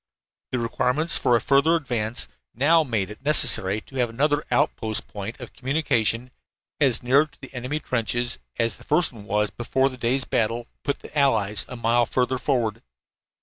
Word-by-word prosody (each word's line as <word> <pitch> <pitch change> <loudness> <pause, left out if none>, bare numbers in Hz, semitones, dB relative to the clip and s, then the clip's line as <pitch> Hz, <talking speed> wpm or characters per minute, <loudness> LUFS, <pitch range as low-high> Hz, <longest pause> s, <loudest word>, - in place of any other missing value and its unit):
The 130 - -2
requirements 125 +7 0
for 120 - +2
a - - +4
further 140 +7 +3
advance 120 -7 -2 0.3
now 155 +7 +4
made 110 -8 -2
it 105 - -11
necessary 110 -8 +4
to 135 - -11
have 125 -2 +1
another 145 +5 +1
outpost 110 -3 0
point 105 +4 -7
of 125 - -10
communication 125 -4 0 0.5
as 130 -6 +2
near 140 +5 +4
to - - -26
the 135 - -12
enemy 130 +4 -3
trenches 120 -2 -1 0.2
as 115 -1 0
the - - -16
first 150 -1 +1
one 105 -3 -12
was 105 +1 0
before 130 +3 0
the 130 - -10
day's 125 +2 +1
battle 115 +1 -1 0.2
put 140 - -2
the - - -13
Allies 105 -8 +2
a 125 - -6
mile 120 0 +2
further 130 0 0
forward. 115 -4 -1
125 Hz, 175 wpm, -24 LUFS, 115-140 Hz, 0.5 s, a